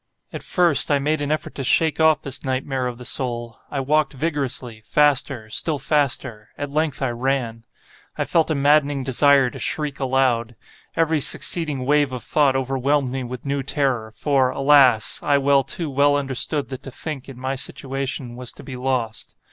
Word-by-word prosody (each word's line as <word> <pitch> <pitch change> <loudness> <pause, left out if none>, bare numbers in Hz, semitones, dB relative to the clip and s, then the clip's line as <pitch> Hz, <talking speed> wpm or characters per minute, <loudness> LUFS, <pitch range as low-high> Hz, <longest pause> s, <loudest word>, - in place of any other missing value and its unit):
At - - -6
first, 175 -5 +3
I 145 - +3
made 150 +2 -1
an 145 0 -2
effort 155 - -3
to 135 - -5
shake 160 +5 +2
off 160 -1 +3
this 135 -2 -4
nightmare 130 -1 -2
of 120 -1 -6
the 125 - -11
soul. 120 -2 -2
I 140 - -3
walked 150 +3 +1
vigorously—faster—still 135 -1 0
faster—at 140 -3 -2
length 150 -2 -1
I 135 - 0
ran. 120 -2 -2 0.5
I - - -1
felt 165 -1 +1
a 155 - 0
maddening 145 -1 +2
desire 135 0 +3
to - - -10
shriek 150 -2 -2
aloud. 130 -3 0 0.4
Every 160 -1 +1
succeeding 145 -2 +2
wave 145 -1 +2
of 125 -3 -5
thought 140 -3 +2
overwhelmed 135 +1 0
me 130 0 -3
with 125 +1 -8
new 140 0 -1
terror, 130 -5 -1
for, 135 +2 +1
alas! 135 -5 +4
I 145 -1 +2
well, 140 0 +3
too 165 +5 -4
well 145 +1 +3
understood 140 +1 0
that 130 -1 -7
to 135 - -9
think, 140 0 -7
in 135 - -10
my 130 +1 -3
situation, 135 -2 -5
was 125 -1 -5
to - - -13
be 135 - -8
lost. 125 -4 -3
135 Hz, 170 wpm, -21 LUFS, 125-145 Hz, 0.5 s, alas